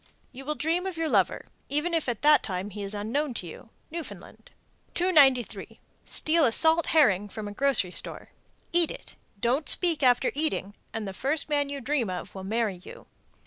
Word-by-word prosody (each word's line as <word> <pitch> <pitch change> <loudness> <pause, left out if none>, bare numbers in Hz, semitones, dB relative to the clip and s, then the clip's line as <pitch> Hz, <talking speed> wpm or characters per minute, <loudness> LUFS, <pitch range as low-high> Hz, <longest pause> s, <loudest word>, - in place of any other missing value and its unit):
You 270 +1 -11
will 300 +1 -2
dream 335 +5 -1
of 370 -3 -5
your 325 -1 -1
lover, 200 - +1 0.2
even 300 +5 -1
if 320 -6 0
at 235 +1 -4
that 300 0 +6
time 190 0 -4
he 205 +2 -7
is 200 +1 -4
unknown 245 +6 -2
to 185 - -5
you. 170 +6 -11 0.2
Newfoundland. 335 0 -9 0.5
293. 285 -9 +2 0.3
Steal 320 +1 +1
a 235 - +3
salt 320 +6 +4
herring 205 - +3
from 210 +1 -6
a 205 - -7
grocery 260 -7 +2
store, - - -3 0.4
eat 345 -2 +3
it, - - -9 0.2
don't 255 +7 0
speak 340 -4 +4
after 250 -1 +3
eating, 285 -9 -2 0.2
and 220 -2 -4
the 195 - -5
first 280 +9 -2
man 290 -1 0
you 280 0 -4
dream 260 -4 -1
of 180 -1 -6
will 190 - -8
marry 215 -1 -1
you. - - -12
270 Hz, 185 wpm, -27 LUFS, 210-310 Hz, 0.5 s, that